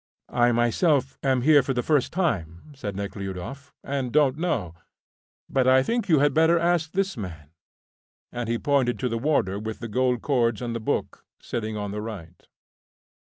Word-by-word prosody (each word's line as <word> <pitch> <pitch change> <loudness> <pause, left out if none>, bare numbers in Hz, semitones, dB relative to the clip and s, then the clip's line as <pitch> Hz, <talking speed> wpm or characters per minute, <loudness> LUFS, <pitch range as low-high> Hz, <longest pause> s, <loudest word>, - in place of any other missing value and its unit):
"I 120 0 +4
myself 130 +4 +1
am 130 -2 +1
here 150 0 +6
for 135 0 -2
the 125 - 0
first 150 -5 +1
time," 110 - -2
said 105 -8 -6
Nekhludoff, 100 +7 -6
"and 135 -3 -3
don't 140 -2 +3
know; 120 - -2 0.7
but 130 -1 +1
I 130 0 +5
think 230 - -1
you 160 - +5
had 145 0 +3
better 160 +3 +4
ask 170 -1 +1
this 195 0 0
man," 80 - -8 0.8
and 120 -2 -4
he 115 - +1
pointed 135 -2 +1
to 125 - -1
the 115 0 -2
warder 115 -8 +1
with 110 +1 -5
the 115 - -6
gold 125 +2 0
cords 120 -6 +1
and 120 -1 -4
the - - -2
book, 110 - -3 0.2
sitting 110 -2 -4
on 105 -1 -4
the 105 +1 -4
right. 95 -6 -9
125 Hz, 175 wpm, -25 LUFS, 110-145 Hz, 0.8 s, here